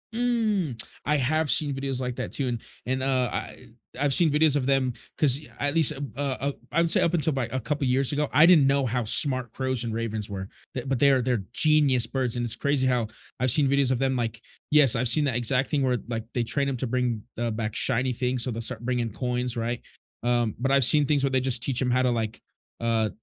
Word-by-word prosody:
Mm, 215 - -1 0.2
I 150 +1 +2
have 155 +3 0
seen 145 -2 +3
videos 135 -1 -4
like 125 -1 -4
that - - -6
too, 135 -3 -2
and 120 -2 -4 0.2
and, 130 +1 -2
uh, 130 -2 0
I - - -7 0.3
I've 140 -2 +2
seen 160 -1 +6
videos 150 -1 +3
of 135 -3 -1
them, 135 -2 0 0.2
'cause 140 -2 +5
y 150 - -16
at 145 +2 -2
least 160 -4 +6
a 140 - -8
b 140 - -7
uh, 140 -1 -3 0.2
I - - 0
I - - +4
would 170 - +1
say - - +5
up 170 - 0
until 160 -3 +1
by 130 -3 -2
a 130 - -3
couple 145 +1 -3
years 130 +2 +3
ago, 150 0 -1
I 150 +4 +6
didn't 160 -6 +5
know 140 -1 +1
how 125 +1 -2
smart 130 +1 +2
crows 130 -2 -1
and 115 -2 -5
ravens 110 -2 -2
were, 95 -1 -7 0.2
but 130 +1 -6
but 130 -3 -1
they're 135 -3 +3
they're 120 -5 -2
genius 145 -6 +3
birds, 130 -3 -3
and 120 - -3
it's 120 - +1
crazy 140 -2 0
how 120 -4 0 0.3
I've 130 -1 +4
seen 145 0 +5
videos 140 -2 +2
of 125 - -1
them, 135 -1 -1
like 115 -1 -4 0.3
Yes, 145 -6 +7
I've 125 +2 0
seen 150 +5 +4
that 130 -4 -2
exact 125 +2 +1
thing 145 -2 0
where 130 -1 0
it 120 - -6
like, 115 -1 -4
they 120 - 0
train 140 +4 -2
'em 130 - -4
to 130 - -4
bring, 120 -3 -2 0.2
uh, 120 -1 -2
back 110 0 -5
shiny 125 +2 0
things, 125 0 -1
so 125 - 0
they'll 115 +1 -6
start 115 0 -2
bringing 120 -2 -2
coins, 125 0 -2
right? 115 +1 -4 0.4
Um, 120 -2 -1
but 135 +2 -1
I've 140 -1 +4
seen 145 +4 +5
things 145 -2 +2
where 135 - 0
they 130 - +1
just 125 -2 +1
teach 135 -1 -2
'em 125 - -1
how 130 +1 +1
to, 125 - +1
like, 110 -2 -4 0.4
uh 115 -2 -1
130 Hz, 255 wpm, -24 LUFS, 120-140 Hz, 0.4 s, Yes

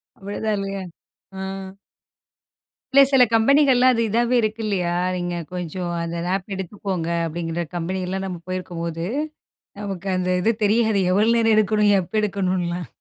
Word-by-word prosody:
அவ்ளோதான் 205 +2 -3
இல்ல 195 0 -3 0.4
அ. 190 0 -14 1.5
இல்ல 275 - +8
சில 265 -2 +6
கம்பெனிகள்லாம் 255 +1 +5
அது 230 - 0
இதாவே 240 +3 +2
இருக்கு 220 +1 -2
இல்லையா, 180 -4 0 0.2
நீங்க 175 -1 -3 0.2
கொஞ்சம் 180 0 -4
அந்த 170 0 -4
நாப் 190 +2 -2
எடுத்துக்கோங்க. 190 -2 -4 0.2
அப்படிங்கிற 165 +1 -3
கம்பெனியெல்லாம் 185 +2 -2
நம்ம 180 -3 -5
போயிருக்கும்போது, 170 -2 -4 0.8
நமக்கு 195 -2 -5
அந்த 185 0 -1
இது 225 - +3
தெரியாது 220 0 +3
எவ்வளோ 210 +4 +3
நேரம் 225 -1 +4
எடுக்கணும்? 210 -1 +3
எப்போ 180 +3 -10
எடுக்கணுன்லாம். 180 -4 -1
195 Hz, 130 wpm, -22 LUFS, 175-215 Hz, 1.5 s, இல்ல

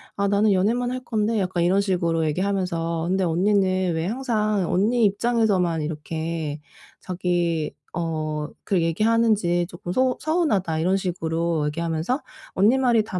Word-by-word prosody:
"아 200 0 0
나는 205 0 +3
연애만 235 +6 +1
할 255 0 -4
건데?" 220 -1 0
약간 180 -2 0
이런 190 +3 +3
식으로 170 -4 0
얘기하면서 170 -2 -1
"근데 190 0 +1
언니는 185 0 +2
왜 160 +2 -1
항상 215 -6 0
언니 225 +6 +2
입장에서만 200 -6 +2
이렇게 160 0 -4 0.4
자기 175 -3 -1 0.2
어 160 -2 -2 0.3
그 185 -4 +1
얘기 165 +5 0
하는지 215 -7 +2
쪼끔 175 0 -7
소 255 +3 +1
서운하다." 215 - 0
이런 185 +4 +2
식으로 165 -3 -1
얘기하면서 165 - -2 0.3
"언니 215 +8 +4
말이 240 -4 +3
다 185 -4 -4
185 Hz, 320 characters per minute, -23 LUFS, 165-215 Hz, 0.4 s, 언니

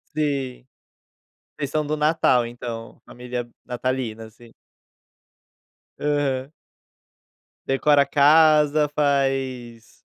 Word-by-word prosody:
Sim. 140 -5 -2 0.9
Vocês 145 -2 -3
são 150 +1 -1
do 155 +1 -2
Natal, 150 -5 +2
então, 115 -1 -8
família 125 0 -6 0.2
natalina, 125 -2 -3
assim? 115 +1 -17 1.5
Aham. 145 -2 -1 1.1
Decora 140 +2 +3
a - - -9
casa, 150 +1 +4
faz 135 -5 -2
135 Hz, 85 wpm, -23 LUFS, 125-150 Hz, 1.5 s, casa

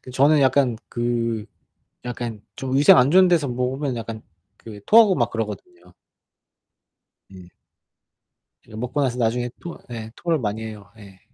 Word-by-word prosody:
그 130 - -12
저는 145 +4 +3
약간 130 -3 +2
그 115 -2 -2 0.6
약간 120 -3 -5
좀 130 0 -3
위생 140 0 +7
안 125 +3 +4
좋은 185 +1 +6
데서 170 -5 +2
먹으면 125 +2 -2
약간 115 -1 -7 0.4
그 105 -3 -11
토하고 215 -3 +6
막 120 -6 0
그러거든요. 90 -5 -7 1.4
예. 95 -2 -13 1.2
이제 110 - -12
먹고 125 +6 -3
나서 125 -2 -1
나중에 120 +1 0
토 170 - -8
예 110 -1 -7
토를 165 -2 -1
많이 110 -2 -3
해요. 105 -2 -9
예. 100 -3 -15
120 Hz, 265 characters per minute, -22 LUFS, 110-135 Hz, 1.4 s, 위생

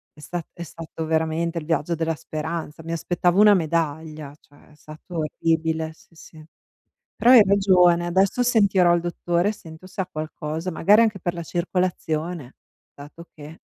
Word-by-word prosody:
È 150 - -18
sta 170 +3 -5
è 170 - -11
stato 165 -1 -7
veramente 160 +1 -1
il 155 - -4
viaggio 165 +1 -1
della 165 0 -1
speranza. 160 0 -6
Mi 165 - -6
aspettavo 175 +2 0
una 210 -1 +7
medaglia, 155 -3 -2
cioè 145 +1 -23
è 150 - -20
stato 155 +3 -11
orribile, 160 0 -1
sì, - - -25
sì. 160 -1 -15 0.7
Però 240 - +2
hai 250 -4 +9
ragione, 180 -3 +4
adesso 190 +6 +1
sentirò 200 -7 +3
il 170 - -1
dottore, 175 +2 -1
sento 165 -4 -13
se 190 +1 -5
ha 185 - -5
qualcosa, 155 +2 -5
magari 205 +7 +4
anche 215 -4 -1
per 175 0 -3
la 170 - -5
circolazione, 170 -4 -3 0.4
dato 150 +4 -12
che 155 +2 -12
165 Hz, 160 wpm, -23 LUFS, 155-180 Hz, 0.7 s, hai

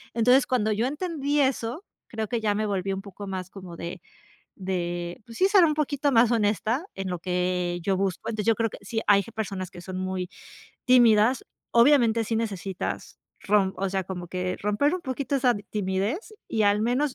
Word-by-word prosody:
entonces 250 +3 +4
cuando 220 -4 +1
yo 220 +4 +1
entendí 295 -1 -1
eso, 265 - -1 0.2
creo 220 -1 -4
que 235 +1 -2
ya 210 -2 +1
me 215 +1 0
volví 195 -2 -1
un 195 0 -3
poco 200 0 -9
más 185 -1 -5
como 185 -4 -10
de 170 +2 -6 0.6
de 175 -1 -3
pues 230 - -11
sí, 375 - +4
ser 390 -2 +6
un 315 -2 +4
poquito 290 -1 0
más 235 -2 +5
honesta 220 - +1
en 195 -1 -4
lo 180 -1 -3
que 180 0 -1
yo 190 +3 +1
busco, 195 +2 -2
entonces 215 -3 -3
yo 225 - +4
creo 225 +1 0
que - - -9
sí 225 +3 -3
hay 200 -1 +5
g 230 - -12
personas 195 -5 -4
que 175 - -11
son 185 +1 -6
muy 185 -1 -3 0.6
tímidas, 240 -1 +5 0.3
obviamente 235 -2 +5
sí 225 - -2
necesitas 195 -5 -4 0.2
rom 195 -2 +2
o 195 +1 -1
sea, 190 0 -1
como 180 -1 -6
que 180 +1 -3
romper 210 +9 +1
un 365 - -3
poquito 275 -1 -2
esa 250 -2 +3 0.2
timidez 210 - -2
y 220 - +1
al 205 0 +3
menos 255 +4 +1
210 Hz, 195 wpm, -26 LUFS, 190-250 Hz, 0.6 s, ser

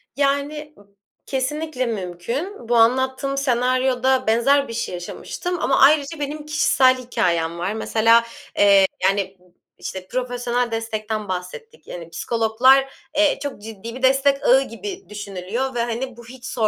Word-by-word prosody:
Yani 290 +2 -1
b - - -17 0.4
kesinlikle 270 0 -2
mümkün. 230 - -5
Bu 240 - +3
anlattığım 260 +4 +2
senaryoda 255 0 +1
benzer 275 +5 +3
bir 230 - -7
şey 230 - -3
yaşamıştım. 350 - -5
Ama 270 - +2
ayrıca 290 +2 +4
benim 295 +1 -4
kişisel 265 -4 +3
hikâyem 170 -9 -1
var. 180 +4 -2
Mesela, 225 +1 +3 0.3
eee, 200 -1 +6 0.2
yani 195 0 +1
b - - -27 0.3
işte, 185 -1 -7
profesyonel 245 0 -2
destekten 220 -1 -3
bahsettik. 190 - -7
Yani 170 -1 -8
psikologlar, 240 +8 +2 0.2
eee, 305 -1 +3
çok 280 -7 -6
ciddi 225 +1 -8
bir 260 - -9
destek 275 +1 +3
ağı 265 +2 +5
gibi 380 - -7
düşünülüyor 210 +5 -4
ve - - -1
hani 240 +1 -4
bu 235 - -12
hiç 250 +1 -12
sor 225 -4 0
245 Hz, 145 wpm, -21 LUFS, 220-275 Hz, 0.4 s, eee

